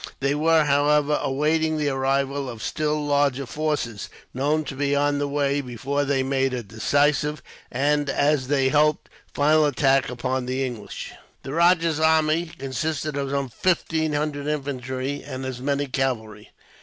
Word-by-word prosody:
They 140 +1 +1
were, 160 +1 +3
however, 145 +1 +2
awaiting 155 +3 +1
the 150 -1 0
arrival 135 0 0
of 115 -3 -8
still 150 -1 -1
larger 140 -2 +1
forces, 145 -6 -3 0.2
known 150 +4 0
to 140 -2 -7
be 140 +1 0
on 145 0 +1
the 145 - 0
way, 140 0 0
before 135 +3 -2
they 135 -1 +1
made 135 -1 0
a 120 - -4
decisive 145 +8 +1 0.3
and, 145 +2 +1
as 145 -1 +1
they 135 -1 +2
hoped, 150 +1 +2 0.2
final 150 +1 +3
attack 135 -2 +2
upon 125 +1 -2
the 130 +1 -1
English. 120 -5 -7 0.3
The 135 - -6
rajah's 165 -1 +3
army 160 +1 +3
consisted 150 +3 -3
of 140 -1 -2
some 140 -1 -1
fifteen 160 +1 0
hundred 145 -1 -2
infantry, 135 -1 -3
and 130 0 -6
as 130 -1 -5
many 140 +1 0
cavalry. 115 -6 -3
145 Hz, 155 wpm, -24 LUFS, 135-150 Hz, 0.3 s, were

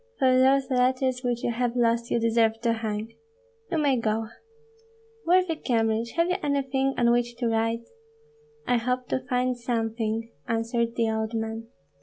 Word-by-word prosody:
For 260 -2 +4
those 265 +1 +3
letters 255 0 +1
which 240 -1 -1
you - - +1
have 240 0 -1
lost 235 -1 +1
you - - +1
deserve 225 -1 +2
to 235 -1 +2
hang. 220 0 -4 0.6
You 335 - +1
may 285 -4 +2
go. 220 -1 -1 1.0
Worthy 360 -1 +3
Kyemlich, 230 -4 0
have 335 +1 +2
you 360 - 0
anything 270 -2 0
on 235 -1 +4
which 240 0 +1
to 240 -1 -1
write?" 225 +1 0 0.8
"I 245 - +2
hope 250 +2 -2
to - - 0
find 250 0 +1
something," 225 -1 -2 0.2
answered 230 +1 -1
the 230 -1 +1
old 220 +1 -2
man. 225 0 -4
235 Hz, 160 wpm, -26 LUFS, 225-255 Hz, 1.0 s, For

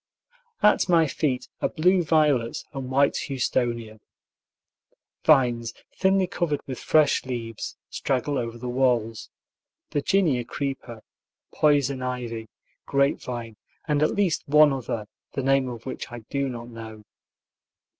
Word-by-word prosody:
At 210 -2 +4
my 165 -2 +5
feet 140 -3 -1
are - - +1
blue 180 +3 +3
violets 150 -7 +2
and 135 -2 -5
white 140 +1 +3
houstonia. 120 -4 -1 1.2
Vines, 120 -6 +3 0.2
thinly 190 0 +3
covered 165 -5 -2
with 130 -2 -6
fresh 155 -2 +3
leaves, 115 -3 -5
straggle 135 +1 -1
over 115 -1 -4
the 125 +1 -6
walls, 120 -3 0 0.6
Virginia 145 -4 +2
creeper, 120 -3 -5 0.5
poison 140 -3 +2
ivy, 120 -3 -4 0.4
grapevine, 125 -5 -1 0.3
and 150 -1 +1
at 155 - +2
least 195 -5 +1
one 150 0 +6
other, 115 -4 -3 0.3
the 135 - -2
name 135 -1 +2
of 120 -2 -8
which 130 - -6
I 120 -1 -7
do 140 -1 0
not 120 -1 -7
know. 110 -2 -9
130 Hz, 125 wpm, -25 LUFS, 120-150 Hz, 1.2 s, one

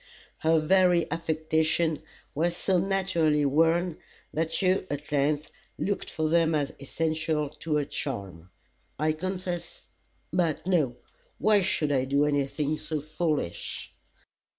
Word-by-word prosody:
Her 160 0 +4
very 180 +1 +4
affectations 160 0 +1 0.3
were 165 +4 +2
so 180 +1 +1
naturally 175 -6 +2
worn, 165 +4 +2 0.3
that 160 +1 -1
you 185 0 +2
at 145 +1 -5
length 145 +1 +1 0.3
looked 200 0 -2
for 155 -1 -1
them 165 0 +3
as 145 -2 -1
essential 155 +1 -1
to 155 +1 -3
her 150 -1 +1
charm. 95 - -5 0.5
I 155 +1 +2
confess 180 +1 -4 0.5
but 170 -4 +1
no! 155 -10 +2 0.4
Why 210 -2 +4
should 160 -5 0
I 130 -2 +2
do 140 +2 +2
anything 145 +1 0
so 155 -1 -3
foolish? 155 - -3
160 Hz, 125 wpm, -28 LUFS, 150-175 Hz, 0.5 s, Her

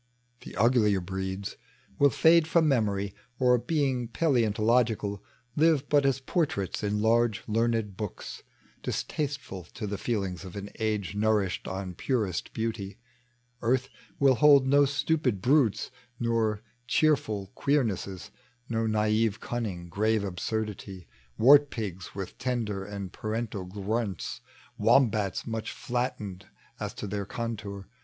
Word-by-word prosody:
The - - -11
uglier 105 -2 +4
breeds 95 +2 -4 0.4
will 140 - +6
fade 160 +5 +5
from 160 -1 +3
memory, 100 -7 +1 0.2
Or, 125 -1 +4
beii^ 130 -5 0
paleontologieal. 115 - +2 0.4
Live 155 -2 +3
irat 145 -1 +4
as 135 -1 +2
portraits 135 - -1
in 105 0 0
large 115 -1 +2
learned 115 -2 0
books, 105 -3 -6 0.4
Distasteful 140 - -3
to - - -4
the 100 -1 -4
feelings 95 -6 -2
of 95 -1 -9
an 100 0 -6
age 105 -3 -1
Nourished 105 -2 +1
on 95 -1 -4
purest 105 -3 -1
beauty. 110 -3 -3 0.6
Earth 125 +2 +1 0.3
will 135 -1 +5
hold 140 0 +6
No 140 +2 +5
stupid 140 -5 0
brutes, 125 0 +2 0.3
no 115 -3 +1 0.3
cheerful 110 -10 +1
queernesses. 110 -9 -1 0.4
No 115 -1 0
naive 110 0 +1
cunning, 105 -9 -4
grave 110 +4 +1
absurdity. 100 -1 -4 0.3
Wart 145 +4 +7
pigs 95 -7 -6
with 95 -2 -6
tender 115 -6 -2
and 100 -2 -6
parental 110 -3 -3
grunts, 100 +1 -3 0.4
Wombats 110 -4 +3
much 110 -1 -3
flattened 115 -7 -3 0.3
as - - -4
to - - -5
their 100 -1 -3
contour. 105 -5 -5
110 Hz, 120 wpm, -28 LUFS, 100-125 Hz, 0.6 s, Wart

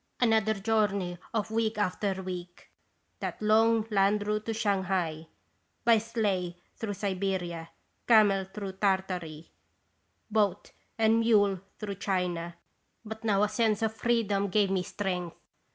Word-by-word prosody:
Another 220 -3 +3
journey 200 -4 0
of 220 -1 -2
week 225 0 0
after 190 -1 -1
week, 180 -1 -8 0.5
that - - -4
long 220 +1 +3
land 205 +1 +2
route 210 +1 -2
to 225 - 0
Shanghai, 190 -6 -1 0.6
by 230 -2 +6
sleigh 205 -6 -1 0.2
through 205 -3 -4
Siberia, 185 -4 -2 0.4
camel 205 -4 +5
through 195 0 -6
Tartary, 185 -5 -2 0.8
boat 210 -3 +1 0.3
and 225 0 +4
mule 205 -4 +3 0.2
through 205 -2 -5
China; 175 -3 -1 0.5
but 220 +1 -7
now 205 -2 +2
a - - +4
sense 220 -1 +1
of 220 0 0
freedom 215 -3 +1
gave 200 0 +2
me 190 -1 +1
strength. 180 -2 -3
200 Hz, 125 wpm, -29 LUFS, 185-220 Hz, 0.8 s, by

